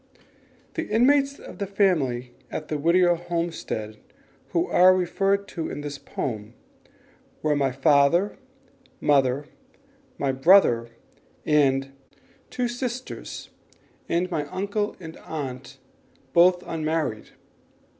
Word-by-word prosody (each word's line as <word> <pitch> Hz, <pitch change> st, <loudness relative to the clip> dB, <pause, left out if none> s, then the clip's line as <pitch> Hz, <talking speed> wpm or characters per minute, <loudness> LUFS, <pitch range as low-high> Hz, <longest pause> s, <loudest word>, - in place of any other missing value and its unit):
The 325 Hz, -1 st, -3 dB
inmates 275 Hz, +5 st, +3 dB
of -, -, -12 dB
the 200 Hz, -, -2 dB
family 140 Hz, -12 st, +1 dB, 0.2 s
at 155 Hz, -, -6 dB
the 150 Hz, -, -2 dB
Whittier 175 Hz, +3 st, +4 dB
homestead 170 Hz, -11 st, -4 dB, 0.5 s
who 170 Hz, 0 st, +1 dB
are 185 Hz, +1 st, +6 dB
referred 195 Hz, +2 st, 0 dB
to 165 Hz, -3 st, -4 dB
in -, -, -5 dB
the 145 Hz, -1 st, -6 dB
poem 110 Hz, -2 st, -5 dB, 0.9 s
were 150 Hz, -1 st, +2 dB
my 135 Hz, -2 st, +1 dB
father, 145 Hz, -, +3 dB, 0.6 s
mother, 140 Hz, -1 st, +2 dB, 0.7 s
my 140 Hz, -1 st, 0 dB
brother 130 Hz, -5 st, +5 dB, 0.6 s
and 135 Hz, -3 st, +2 dB, 0.6 s
two 250 Hz, -1 st, -1 dB
sisters, 245 Hz, +1 st, -6 dB, 0.6 s
and 180 Hz, +2 st, 0 dB
my 150 Hz, -3 st, -2 dB
uncle 200 Hz, +5 st, -2 dB
and 160 Hz, -3 st, -9 dB
aunt 135 Hz, -3 st, -7 dB, 0.6 s
both 180 Hz, +1 st, +5 dB
unmarried. 155 Hz, -8 st, -2 dB
165 Hz, 105 wpm, -25 LUFS, 135-190 Hz, 0.9 s, are